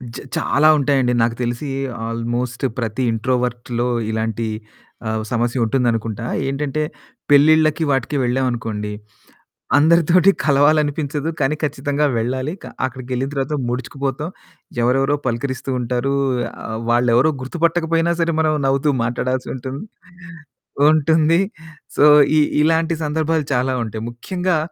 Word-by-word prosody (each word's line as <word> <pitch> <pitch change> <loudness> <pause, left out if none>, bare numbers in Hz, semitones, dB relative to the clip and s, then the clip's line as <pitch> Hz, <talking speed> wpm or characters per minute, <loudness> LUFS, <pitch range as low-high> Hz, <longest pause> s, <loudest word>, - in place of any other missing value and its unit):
జ - - -5 0.2
చాలా 150 +2 +2
ఉంటాయండి. 135 -3 +2
నాకు 115 0 +1
తెలిసి 120 +4 -3 0.4
ఆల్‌మోస్ట్ 120 +2 -3 0.2
ప్రతి 115 +2 -2
ఇంట్రోవర్ట్‌లో 120 0 -1 0.2
ఇలాంటి 110 0 -2 0.6
ఆహ్, 110 0 -1
సమస్య 120 +1 0
ఉంటుందనుకుంటా. 115 -2 -1 0.2
ఏంటంటే 140 +2 -2 0.5
పెళ్ళిళ్ళకి 155 +2 +5
వాటికి 135 +1 -1
వెళ్ళాం 125 +2 +1
అనుకోండి. 110 -3 -4 0.9
అందరితోటి 170 +4 +5
కలవాలనిపించదు 145 +1 +2
కానీ 145 +1 +1
ఖచ్చితంగా 145 0 0
వెళ్ళాలి. 130 +6 -2
క - - -8 0.2
అక్కడికెళ్ళిన 130 0 -4
తర్వాత 140 +1 -1
ముడుచుకుపోతాం 135 +4 -3 0.5
ఎవరెవరో 135 +4 +2
పలకరిస్తూ 130 +2 -3
ఉంటారు. 125 +3 -1 0.5
ఆహ్, 110 - -4
వాళ్ళెవరో 120 +4 +3
గుర్తుపట్టకపోయినా 165 +3 0
సరే 165 0 +1
మనం 155 -1 +2
నవ్వుతూ 135 +2 +2
మాట్లాడాల్సి 125 +2 -2
ఉంటుంది. 130 +2 -6 1.1
ఉంటుంది 155 +1 +3 0.6
సో - - +3 0.3
ఇ - - +6 0.2
ఇలాంటి 165 +1 +2
సందర్భాలు 155 0 0
చాలా 130 +1 +1
ఉంటాయి. 110 -1 -6
ముఖ్యంగా 180 +8 -2
135 Hz, 110 wpm, -20 LUFS, 120-150 Hz, 1.1 s, ఇ